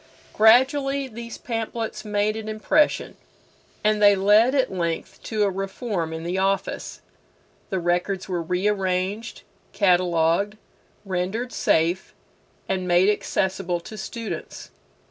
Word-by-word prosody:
Gradually 270 Hz, +5 st, +4 dB
these 235 Hz, -1 st, -8 dB
pamphlets 225 Hz, -1 st, -4 dB
made 210 Hz, 0 st, 0 dB
an 220 Hz, -1 st, -5 dB
impression, 215 Hz, +8 st, +1 dB, 0.7 s
and 215 Hz, 0 st, +2 dB
they 205 Hz, -1 st, +7 dB
led 210 Hz, +7 st, +4 dB
at 265 Hz, -7 st, +1 dB
length 170 Hz, -3 st, -3 dB
to 215 Hz, -2 st, 0 dB
a 200 Hz, -, +3 dB
reform 195 Hz, -2 st, -3 dB
in 160 Hz, 0 st, -5 dB
the 180 Hz, +2 st, -2 dB
office. 195 Hz, 0 st, -2 dB, 0.7 s
The 190 Hz, -, -1 dB
records 180 Hz, +2 st, -1 dB
were 180 Hz, -3 st, -2 dB
rearranged, 190 Hz, +3 st, -1 dB, 0.3 s
catalogued, 180 Hz, +1 st, +2 dB, 0.5 s
rendered 195 Hz, +6 st, -2 dB
safe, 170 Hz, +4 st, +1 dB, 0.5 s
and 185 Hz, -1 st, -2 dB
made 180 Hz, +3 st, +4 dB
accessible 190 Hz, -3 st, -1 dB
to 215 Hz, -, -10 dB
students. 220 Hz, +2 st, -6 dB
195 Hz, 115 wpm, -24 LUFS, 180-220 Hz, 0.7 s, they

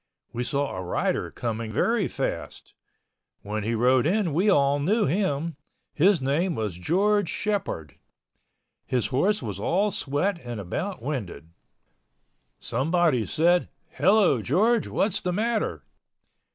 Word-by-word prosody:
We 120 Hz, -, -2 dB
saw 140 Hz, -1 st, -1 dB
a 95 Hz, -, -4 dB
rider 90 Hz, -, -1 dB
coming 115 Hz, -1 st, -4 dB
very 215 Hz, -, +1 dB
fast. -, -, -5 dB, 0.7 s
When 105 Hz, +1 st, -3 dB
he 115 Hz, +2 st, -1 dB
rode 125 Hz, +4 st, +3 dB
in 190 Hz, -3 st, +1 dB
we 185 Hz, +7 st, +2 dB
all 140 Hz, -5 st, +3 dB
knew 205 Hz, +10 st, +2 dB
him. 165 Hz, -2 st, -1 dB, 0.4 s
His 180 Hz, +3 st, +4 dB
name 150 Hz, +6 st, 0 dB
was 105 Hz, -4 st, -2 dB
George 200 Hz, -, +2 dB
Shepord. 195 Hz, -, -3 dB, 0.9 s
His 125 Hz, -3 st, 0 dB
horse 195 Hz, +7 st, +1 dB
was 100 Hz, -4 st, -5 dB
all 195 Hz, -, +1 dB
sweat 170 Hz, +6 st, -1 dB
and 120 Hz, -3 st, -6 dB
about 115 Hz, -, -4 dB
winded. 105 Hz, -, -5 dB, 1.1 s
Someone 155 Hz, -6 st, +1 dB
said, 175 Hz, +3 st, +2 dB, 0.2 s
"Hello, 190 Hz, -, +3 dB
George. 210 Hz, -, +2 dB
What 205 Hz, -, +1 dB
is 185 Hz, -, 0 dB
the 180 Hz, -, -1 dB
matter?" 220 Hz, +3 st, -1 dB
155 Hz, 130 wpm, -25 LUFS, 120-195 Hz, 1.1 s, His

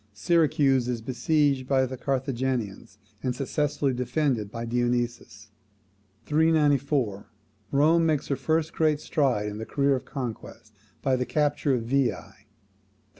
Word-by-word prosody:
Syracuse 140 Hz, -, +2 dB
is 125 Hz, -2 st, -2 dB
besieged 135 Hz, +2 st, 0 dB
by 130 Hz, -1 st, +3 dB
the 130 Hz, +1 st, -5 dB
Carthaginians, 130 Hz, -5 st, -3 dB, 0.2 s
and 125 Hz, -2 st, -2 dB
successfully 140 Hz, 0 st, -1 dB
defended 125 Hz, -3 st, -1 dB
by 115 Hz, +2 st, -5 dB
Dionysius. 120 Hz, -3 st, -2 dB, 0.7 s
394. 145 Hz, -8 st, +1 dB, 0.4 s
Rome 155 Hz, +4 st, +4 dB
makes 155 Hz, -3 st, 0 dB
her 140 Hz, -, +1 dB
first 160 Hz, +2 st, -1 dB
great 155 Hz, -2 st, +2 dB
stride 130 Hz, -10 st, 0 dB
in 105 Hz, 0 st, -5 dB
the 110 Hz, -, -5 dB
career 140 Hz, -1 st, +2 dB
of 130 Hz, -, -5 dB
conquest 115 Hz, -4 st, -7 dB, 0.3 s
by 135 Hz, -1 st, +2 dB
the 125 Hz, -1 st, -2 dB
capture 145 Hz, 0 st, +1 dB
of 120 Hz, -, -2 dB
Veii. 130 Hz, +1 st, +1 dB
135 Hz, 125 wpm, -26 LUFS, 120-150 Hz, 0.7 s, Rome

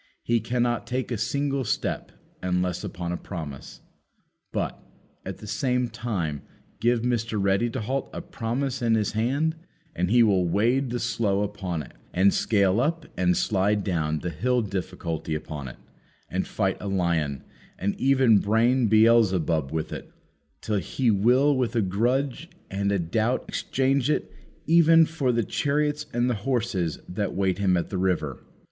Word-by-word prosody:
He 115 Hz, 0 st, +2 dB
cannot 120 Hz, +1 st, -1 dB
take 130 Hz, +1 st, -2 dB
a -, -, 0 dB
single 140 Hz, +4 st, 0 dB
step 110 Hz, -, -2 dB, 0.3 s
unless 90 Hz, -1 st, -1 dB
upon 85 Hz, -1 st, -4 dB
a 90 Hz, -, -2 dB
promise. 70 Hz, -10 st, -8 dB, 0.7 s
But, -, -, -3 dB, 0.4 s
at -, -, -6 dB
the -, -, -11 dB
same 125 Hz, +1 st, 0 dB
time, 85 Hz, -, -3 dB, 0.4 s
give 120 Hz, 0 st, +2 dB
Mr. 115 Hz, -3 st, 0 dB
Ready 100 Hz, +4 st, +2 dB
to -, -, -4 dB
halt 130 Hz, +5 st, -2 dB
a -, -, -5 dB
promise 125 Hz, +4 st, -3 dB
in 115 Hz, -1 st, +3 dB
his 110 Hz, -2 st, 0 dB
hand 140 Hz, +9 st, 0 dB, 0.4 s
and 90 Hz, 0 st, 0 dB
he 120 Hz, +2 st, +6 dB
will 95 Hz, -5 st, +3 dB
wade 120 Hz, +8 st, +2 dB
the 120 Hz, +1 st, -2 dB
Slough 105 Hz, -4 st, 0 dB
upon 95 Hz, -6 st, -4 dB
it, -, -, -13 dB, 0.2 s
and 95 Hz, +2 st, +4 dB
scale 100 Hz, -1 st, +2 dB
up 165 Hz, +6 st, 0 dB
and 90 Hz, -1 st, +2 dB
slide 105 Hz, +1 st, +1 dB
down 80 Hz, -5 st, -1 dB
the 90 Hz, -, -3 dB
Hill 125 Hz, +10 st, +1 dB
Difficulty 85 Hz, -5 st, -4 dB
upon 75 Hz, -2 st, -6 dB
it, -, -, -9 dB, 0.5 s
and -, -, -1 dB
fight -, -, -1 dB
a 105 Hz, -, -4 dB
lion, 85 Hz, -7 st, 0 dB, 0.3 s
and 100 Hz, +2 st, -1 dB
even 130 Hz, -5 st, +5 dB
brain 115 Hz, +4 st, +3 dB
Beelzebub 100 Hz, -9 st, +3 dB
with 80 Hz, -1 st, -3 dB
it, -, -, -8 dB, 0.5 s
till 105 Hz, -2 st, 0 dB
he 120 Hz, +4 st, 0 dB
will 125 Hz, +8 st, +4 dB
with 125 Hz, -2 st, -1 dB
a 115 Hz, -, +3 dB
grudge 125 Hz, -, 0 dB, 0.2 s
and 100 Hz, +1 st, 0 dB
a 100 Hz, -, +2 dB
doubt 110 Hz, +8 st, 0 dB
exchange 135 Hz, 0 st, 0 dB
it 150 Hz, -, -1 dB, 0.3 s
even 165 Hz, 0 st, +6 dB
for 155 Hz, -5 st, 0 dB
the 115 Hz, -1 st, +1 dB
chariots 150 Hz, +4 st, 0 dB
and 120 Hz, +1 st, +1 dB
the 125 Hz, -, +2 dB
horses 110 Hz, -, -1 dB
that 100 Hz, +3 st, -3 dB
wait 95 Hz, -1 st, 0 dB
him 95 Hz, -3 st, +3 dB
at 85 Hz, -, -3 dB
the 95 Hz, -, -2 dB
river. 90 Hz, -8 st, -1 dB
110 Hz, 165 wpm, -26 LUFS, 90-125 Hz, 0.7 s, he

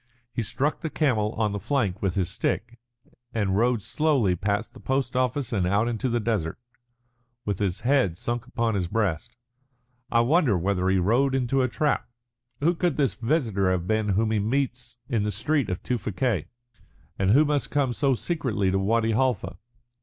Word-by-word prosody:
He -, -, -1 dB
struck 135 Hz, +7 st, -1 dB
the 160 Hz, -, -2 dB
camel 125 Hz, -8 st, +1 dB
on 110 Hz, -2 st, 0 dB
the 100 Hz, -, -3 dB
flank 100 Hz, -5 st, -1 dB
with 95 Hz, -3 st, 0 dB
his 95 Hz, -3 st, +1 dB
stick, 120 Hz, +7 st, -2 dB, 0.6 s
and 100 Hz, -4 st, +1 dB
rode 115 Hz, 0 st, +2 dB
slowly 135 Hz, -, +1 dB
past 100 Hz, +4 st, -2 dB
the -, -, -13 dB
post 130 Hz, -1 st, -1 dB
office 125 Hz, 0 st, 0 dB
and 95 Hz, -5 st, +1 dB
out 100 Hz, +5 st, +2 dB
into 120 Hz, +2 st, -1 dB
the 120 Hz, 0 st, +1 dB
desert, 105 Hz, -8 st, -1 dB, 0.9 s
with 100 Hz, -3 st, -2 dB
his 95 Hz, -3 st, -1 dB
head 125 Hz, -10 st, +2 dB
sunk 120 Hz, +4 st, -3 dB
upon 115 Hz, -3 st, 0 dB
his 95 Hz, -4 st, -1 dB
breast. 105 Hz, +2 st, -1 dB, 0.8 s
I 115 Hz, -, +4 dB
wonder 130 Hz, -, +3 dB
whether 95 Hz, +1 st, 0 dB
he 95 Hz, -, +3 dB
rode 120 Hz, +9 st, +2 dB
into 135 Hz, +1 st, +1 dB
a 130 Hz, -, +2 dB
trap. 150 Hz, +4 st, 0 dB, 0.5 s
Who 165 Hz, +4 st, +3 dB
could 175 Hz, -3 st, 0 dB
this 140 Hz, -3 st, +2 dB
visitor 115 Hz, -, 0 dB
have 90 Hz, -2 st, 0 dB
been 110 Hz, +1 st, 0 dB
whom 110 Hz, 0 st, +1 dB
he 110 Hz, -, +2 dB
meets 120 Hz, +2 st, -2 dB
in 115 Hz, -6 st, 0 dB
the 105 Hz, +1 st, -1 dB
street 145 Hz, -3 st, 0 dB
of 90 Hz, -, -3 dB
Tewfikieh, 110 Hz, -, -1 dB, 0.7 s
and 95 Hz, 0 st, +2 dB
who 140 Hz, +9 st, +6 dB
must 145 Hz, -1 st, 0 dB
come 140 Hz, -4 st, +1 dB
so 135 Hz, +2 st, +2 dB
secretly 120 Hz, -, -1 dB
to 95 Hz, -, +1 dB
Wadi 115 Hz, +3 st, +1 dB
Halfa? 115 Hz, -6 st, 0 dB
115 Hz, 180 wpm, -26 LUFS, 100-135 Hz, 0.9 s, who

